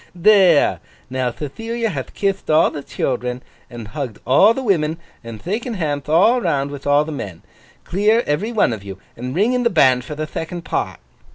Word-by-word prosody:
'There! 180 Hz, -3 st, +5 dB, 0.3 s
Now 130 Hz, -1 st, 0 dB
Thethilia 225 Hz, -, -4 dB
hath 135 Hz, -8 st, -6 dB
kithd 195 Hz, -1 st, -1 dB
all 155 Hz, +1 st, +4 dB
the 145 Hz, -, -6 dB
children, 125 Hz, -2 st, -3 dB, 0.3 s
and 120 Hz, -4 st, -9 dB
hugged 130 Hz, -5 st, -5 dB
all 145 Hz, -, +6 dB
the 265 Hz, -, -3 dB
women, 165 Hz, -8 st, +1 dB, 0.3 s
and 115 Hz, -2 st, -8 dB
thaken 225 Hz, -, -3 dB
handth 150 Hz, -6 st, -3 dB
all 205 Hz, +10 st, +4 dB
round 140 Hz, -5 st, 0 dB
with 145 Hz, 0 st, -7 dB
all 145 Hz, +1 st, +4 dB
the 160 Hz, -, -6 dB
men, 100 Hz, -, -7 dB, 0.4 s
clear, 215 Hz, +5 st, +2 dB
every 185 Hz, +11 st, -1 dB
one 215 Hz, -, +2 dB
of 105 Hz, -3 st, -7 dB
you, 95 Hz, -1 st, -8 dB, 0.2 s
and 125 Hz, +3 st, -6 dB
ring 215 Hz, +7 st, +2 dB
in 250 Hz, -, +1 dB
the 235 Hz, -, +3 dB
band 130 Hz, -, +4 dB
for 150 Hz, -, -7 dB
the 155 Hz, +1 st, -3 dB
thecond 165 Hz, +2 st, -6 dB
part! -, -, -2 dB
155 Hz, 190 wpm, -20 LUFS, 130-200 Hz, 0.4 s, all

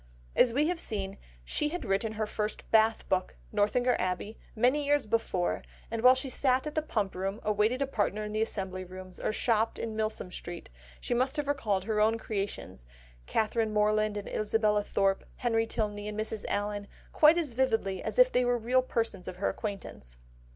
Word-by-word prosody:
As 245 Hz, -, +5 dB
we 290 Hz, +6 st, +2 dB
have 350 Hz, -1 st, -1 dB
seen, 200 Hz, -, -3 dB, 0.3 s
she 300 Hz, -, 0 dB
had 350 Hz, -4 st, -4 dB
written 200 Hz, +2 st, 0 dB
her 215 Hz, 0 st, -1 dB
first 210 Hz, 0 st, -3 dB
Bath 220 Hz, 0 st, +4 dB
book, 185 Hz, -1 st, 0 dB, 0.2 s
Northanger 220 Hz, +4 st, +2 dB
Abbey, 185 Hz, +4 st, -2 dB, 0.2 s
many 255 Hz, +6 st, +3 dB
years 290 Hz, -2 st, +2 dB
before, 210 Hz, -5 st, 0 dB, 0.3 s
and 230 Hz, -1 st, -2 dB
while 255 Hz, +2 st, +8 dB
she 260 Hz, +1 st, -3 dB
sat 260 Hz, +1 st, +1 dB
in 300 Hz, -, -4 dB
the 310 Hz, -, +1 dB
Pump 210 Hz, -10 st, -1 dB
Room, 195 Hz, +3 st, -3 dB
awaited 215 Hz, +5 st, +2 dB
a -, -, 0 dB
partner 215 Hz, -5 st, -1 dB
in 210 Hz, -, -5 dB
the 215 Hz, +1 st, -1 dB
Assembly 190 Hz, -4 st, -2 dB
Rooms, 185 Hz, 0 st, -10 dB
or -, -, 0 dB
shopped 225 Hz, 0 st, +1 dB
in 225 Hz, -1 st, -4 dB
Milsom 215 Hz, -4 st, -2 dB
Street, 175 Hz, -, -8 dB, 0.3 s
she -, -, -2 dB
must 255 Hz, +4 st, +1 dB
have 295 Hz, -1 st, -1 dB
recalled 215 Hz, -10 st, 0 dB
her 215 Hz, +1 st, -1 dB
own 220 Hz, +1 st, +3 dB
creations, 200 Hz, -, -5 dB, 0.4 s
Catherine 220 Hz, -, +1 dB
Morland 215 Hz, 0 st, +2 dB
and 205 Hz, -, -5 dB
Isabella 210 Hz, -1 st, +1 dB
Thorpe, 195 Hz, -1 st, +1 dB
Henry 225 Hz, -2 st, +1 dB
Tilney 210 Hz, -2 st, -2 dB
and 210 Hz, 0 st, -4 dB
Mrs. 215 Hz, -1 st, -2 dB
Allen, 205 Hz, 0 st, -2 dB, 0.3 s
quite 310 Hz, +2 st, +6 dB
as 310 Hz, -8 st, -1 dB
vividly 225 Hz, -7 st, 0 dB
as -, -, -4 dB
if -, -, +7 dB
they 250 Hz, -, +3 dB
were 245 Hz, 0 st, +2 dB
real 245 Hz, +3 st, +2 dB
persons 225 Hz, -7 st, -2 dB
of 185 Hz, -, -5 dB
her 185 Hz, -, 0 dB
acquaintance. 195 Hz, -, -6 dB
215 Hz, 190 wpm, -30 LUFS, 205-245 Hz, 0.4 s, while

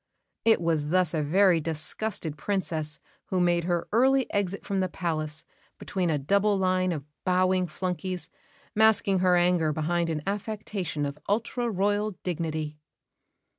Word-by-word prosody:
It 225 Hz, -1 st, +5 dB
was 160 Hz, -3 st, 0 dB
thus 180 Hz, -1 st, +2 dB
a 155 Hz, -, +1 dB
very 180 Hz, +3 st, +4 dB
disgusted 160 Hz, +2 st, -2 dB
Princess 160 Hz, -4 st, -2 dB, 0.3 s
who 185 Hz, -, -1 dB
made 175 Hz, -1 st, +2 dB
her 175 Hz, -1 st, 0 dB
early 260 Hz, +4 st, +4 dB
exit 200 Hz, -1 st, -1 dB
from 195 Hz, -1 st, -1 dB
the 185 Hz, -1 st, 0 dB
palace 155 Hz, -3 st, -3 dB, 0.3 s
between 185 Hz, -3 st, -2 dB
a 155 Hz, -, +2 dB
double 200 Hz, +8 st, +2 dB
line 185 Hz, -1 st, +1 dB
of 150 Hz, -5 st, -4 dB, 0.2 s
bowing 185 Hz, 0 st, +2 dB
flunkeys, 180 Hz, +2 st, -3 dB, 0.5 s
masking 215 Hz, -3 st, +4 dB
her 180 Hz, -1 st, +4 dB
anger 175 Hz, -3 st, +3 dB
behind 165 Hz, +3 st, 0 dB
an 155 Hz, -2 st, -2 dB
affectation 200 Hz, -6 st, -3 dB
of 140 Hz, +1 st, -5 dB
ultra 235 Hz, +3 st, 0 dB
Royal 205 Hz, +1 st, 0 dB
dignity. 155 Hz, -3 st, -3 dB
180 Hz, 140 wpm, -27 LUFS, 160-200 Hz, 0.5 s, It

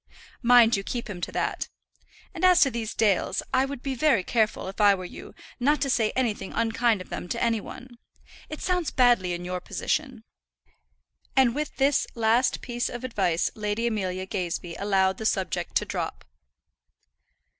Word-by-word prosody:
"Mind 240 Hz, -1 st, +6 dB
you 195 Hz, -, -1 dB
keep 240 Hz, +3 st, -4 dB
him 185 Hz, -5 st, -7 dB
to -, -, -3 dB
that. -, -, -2 dB, 0.6 s
And 350 Hz, -1 st, -7 dB
as 365 Hz, -1 st, +6 dB
to 275 Hz, -, +5 dB
these 225 Hz, -2 st, -4 dB
Dales, 205 Hz, -4 st, +1 dB
I 260 Hz, +1 st, +3 dB
would 275 Hz, -2 st, -7 dB
be 275 Hz, -, -2 dB
very 260 Hz, -6 st, +2 dB
careful, 220 Hz, -3 st, 0 dB
if 195 Hz, +3 st, -5 dB
I 205 Hz, -1 st, +6 dB
were 185 Hz, -1 st, -7 dB
you, -, -, -10 dB, 0.2 s
not 290 Hz, +5 st, +2 dB
to 275 Hz, -, +1 dB
say 225 Hz, -3 st, +2 dB
anything 230 Hz, -6 st, -1 dB
unkind 230 Hz, -2 st, +1 dB
of 185 Hz, -, -11 dB
them 175 Hz, -, -6 dB
to 235 Hz, -, -2 dB
any 230 Hz, -2 st, +1 dB
one. 245 Hz, +2 st, -11 dB, 0.5 s
It 305 Hz, -, -7 dB
sounds 360 Hz, -3 st, 0 dB
badly 240 Hz, -8 st, +3 dB
in 175 Hz, 0 st, -5 dB
your 180 Hz, 0 st, -3 dB
position." -, -, -3 dB, 1.1 s
And 260 Hz, -3 st, +4 dB
with 300 Hz, +2 st, -4 dB
this 275 Hz, +1 st, +2 dB
last 230 Hz, +2 st, +2 dB
piece 240 Hz, 0 st, -2 dB
of 240 Hz, +1 st, -7 dB
advice 190 Hz, -9 st, 0 dB
Lady 210 Hz, +2 st, -2 dB
Amelia 190 Hz, -5 st, -2 dB
Gazebee 180 Hz, -3 st, -4 dB
allowed 190 Hz, -1 st, +1 dB
the 220 Hz, -, -5 dB
subject 190 Hz, -3 st, -2 dB
to -, -, +2 dB
drop. -, -, -4 dB
230 Hz, 175 wpm, -26 LUFS, 195-255 Hz, 1.1 s, Mind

